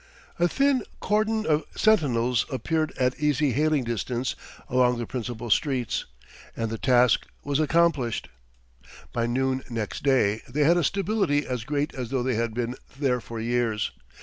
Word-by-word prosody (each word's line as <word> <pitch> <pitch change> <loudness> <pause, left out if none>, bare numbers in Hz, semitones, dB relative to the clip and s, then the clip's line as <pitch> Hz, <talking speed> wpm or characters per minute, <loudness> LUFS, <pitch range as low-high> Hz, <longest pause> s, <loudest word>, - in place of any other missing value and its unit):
A 175 - +4
thin 275 +5 +2 0.2
cordon 215 +1 +1
of 155 0 +2
sentinels 125 - +2
appeared 155 +5 -1
at 125 0 0
easy 150 -1 +2
hailing 150 +1 +2
distance 120 +2 -2 0.3
along 125 -1 +3
the 120 - -3
principal 120 -2 -5
streets, 130 -2 +1 0.5
and 115 -1 -2
the 115 - -4
task 125 -2 +3 0.2
was 140 0 0
accomplished. 155 -6 +2 0.9
By 115 0 0
noon 130 +2 0
next 115 -3 -4
day 120 -6 +2
they 145 +4 +1
had 170 +4 +5
a 175 - +2
stability 195 -5 +1
as 125 -3 -3
great 145 +2 -1
as 125 -3 -5
though 130 -1 0
they 130 0 0
had 115 0 -1
been 120 +1 -2 0.2
there 130 -4 +1
for 115 0 -7
years. 115 -2 0
130 Hz, 155 wpm, -26 LUFS, 120-150 Hz, 0.9 s, had